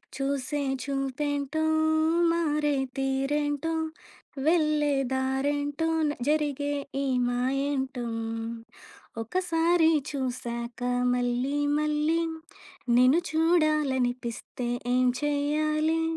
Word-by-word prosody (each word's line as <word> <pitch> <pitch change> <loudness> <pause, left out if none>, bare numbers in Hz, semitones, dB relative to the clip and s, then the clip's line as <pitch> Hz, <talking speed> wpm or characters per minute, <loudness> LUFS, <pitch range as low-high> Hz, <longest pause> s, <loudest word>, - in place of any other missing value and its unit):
చూసే 275 +1 -2 0.2
చూపేంటో 280 +2 -2 0.7
మారే 300 -3 +1 0.2
తీరేంటో 290 +3 0 0.7
వెల్లే 305 -3 +3 0.2
దారెంటో 285 +4 0 0.2
న - - 0 0.2
జరిగే 290 -1 0 0.3
ఈ - - -1 0.2
మాయంటో. 265 0 -1 1.2
ఒకసారి 335 +3 +2 0.2
చూసాక 240 -3 -4 0.3
మల్లి 245 +3 0 0.2
మల్లి 300 +2 +1 0.8
నిను 255 +6 +6
చూడాలనిపిస్తే 265 -7 +1 0.3
ఏం 255 0 +3 0.2
చేయాలే 305 +2 +1
285 Hz, 65 wpm, -27 LUFS, 265-305 Hz, 1.2 s, నిను